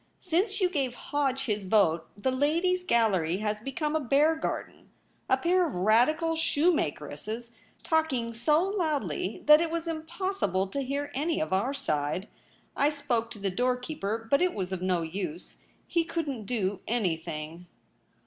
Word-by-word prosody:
Since 375 +5 0
you 370 - +4
gave 275 -8 -1
Hodge 275 -1 -1
his 210 -4 -1
vote 175 -5 +3
the 260 +6 0
Ladies' 335 +7 +1
Gallery 190 - +2
has 210 +1 -2
become 300 +5 -2
a - - +3
bear 295 +4 +3
garden 320 - -5 0.2
— - - -40
a - - +4
pair 360 +2 +3
of 290 - -6
Radical 250 - +3
shoemakeresses 235 - -1 0.3
talking 270 -8 0
so 300 +8 +3
loudly 300 - -1
that 300 +1 +8
It 335 - 0
was 335 0 -3
Impossible 325 - -1
to 280 - -2
hear 280 +2 -3
any 310 +5 0
of 155 +4 -1
our 240 +9 +1
side. 165 - -1 0.5
I 285 - +3
spoke 245 -6 -1
to 230 - -9
the 195 -1 -2
doorkeeper, 250 -1 -2
but 280 - +4
it 360 0 +2
was 190 -2 -3
of 190 -2 -3
no 180 -2 +1
use; 170 0 -5 0.3
he 335 - +1
couldn't 295 -9 -3
do 205 -4 -1
anything.' 165 -6 -2
255 Hz, 160 wpm, -28 LUFS, 195-315 Hz, 0.5 s, that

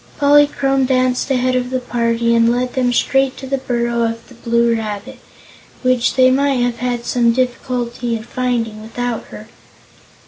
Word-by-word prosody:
Polychrome 285 -2 +3
danced 255 0 +1
ahead 255 -1 +1
of 250 0 -1
the 255 0 -1
party 235 -1 0
and 230 0 +4
led 245 +1 -1
them 250 -2 +1
straight 270 +2 +1
to 270 - -8
the 270 +1 -2
burrow 235 -2 -1
of 230 0 -2
the - - -14
Blue 235 0 +1
Rabbit, 220 +3 -5 0.6
which 255 -1 +2
they 255 -1 +5
might 275 +1 +2
have 245 -1 -1
had 240 0 -3
some 235 -1 +2
difficulty 245 -1 -2
in 220 - -6
finding 235 -3 -2
without 235 +1 -4
her. 215 - -11
245 Hz, 165 wpm, -18 LUFS, 235-255 Hz, 0.6 s, they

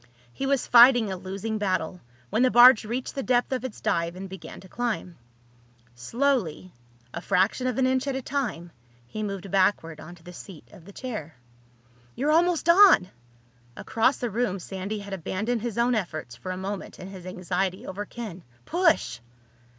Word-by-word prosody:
He 270 - -3
was 275 -2 +1
fighting 240 -3 +7
a - - -2
losing 195 +4 -5
battle 185 -3 -2 0.3
when 225 - +1
the 255 - +5
barge 240 -2 +7
reached 245 +4 -4
the 275 - -3
depth 245 -1 +1
of 260 -1 -2
its 260 -5 -6
dive 170 +1 -1
and 190 +1 -7
began 190 -2 -10
to 190 - -14
climb. 220 -5 -3 0.8
Slowly, 185 - -1 0.4
a - - -5
fraction 200 +7 +1
of 250 - -2
an 265 - +3
inch 260 +1 0
at 275 - -1
a 265 - -3
time, 225 -12 -3 0.3
he 215 - -7
moved 195 -2 -5
backward 185 -5 +1
onto 175 0 -12
the 180 +1 -11
seat 175 -2 -12
of 170 - -15
the 200 - -12
chair. 210 - -7 0.8
"You're 290 +4 0
almost 340 +1 +2
on!" 350 - +7 0.7
Across 230 +4 +1
the 240 -2 -3
room 220 -3 -1
Sandy 195 +3 -5
had 200 -1 -8
abandoned 210 +6 -2
his 235 -2 -4
own 240 +1 +2
efforts 155 - -4
for 120 +11 -7
a 185 - -4
moment 195 +1 -6
in 185 - -9
his 185 -2 -10
anxiety 185 +1 -3
over 195 +2 -5
Ken. 205 -6 -8 0.2
"Push!" 325 - +1
205 Hz, 175 wpm, -26 LUFS, 185-250 Hz, 0.8 s, fighting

